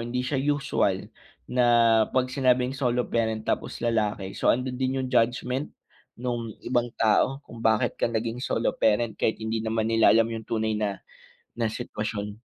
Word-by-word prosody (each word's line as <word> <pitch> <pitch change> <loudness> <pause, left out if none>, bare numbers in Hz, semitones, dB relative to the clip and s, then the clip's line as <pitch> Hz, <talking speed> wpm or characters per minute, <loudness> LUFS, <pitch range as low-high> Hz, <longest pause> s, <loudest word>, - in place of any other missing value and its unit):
hindi 125 +2 -2
siya 130 +1 -1
usual 135 -9 0 0.4
na 125 0 +2 0.4
'pag 130 0 0
sinabing 130 -1 +2
solo 125 -3 0
parent, 110 -1 0
tapos - - -2
lalaki, 105 -4 0
so - - -1
andun 125 +1 +1
din 130 0 0
yung - - -4
judgement 125 +4 +1 0.5
nung 120 -2 -2 0.2
ibang 120 -1 +1
tao 130 +5 +2
kung 115 - -11
bakit 110 -1 +2
ka - - +2
naging 115 +1 -2
solo 115 - 0
parent 110 +1 +2
kahit 110 - 0
hindi 110 0 -2
naman 110 0 0
nila 115 0 +5
alam 115 +1 +5
yung 115 -1 -5
tunay 110 -1 0
na 100 -3 -2 0.6
na 115 - +1
sitwasyon. 105 -2 -5
115 Hz, 165 wpm, -26 LUFS, 110-125 Hz, 0.6 s, nila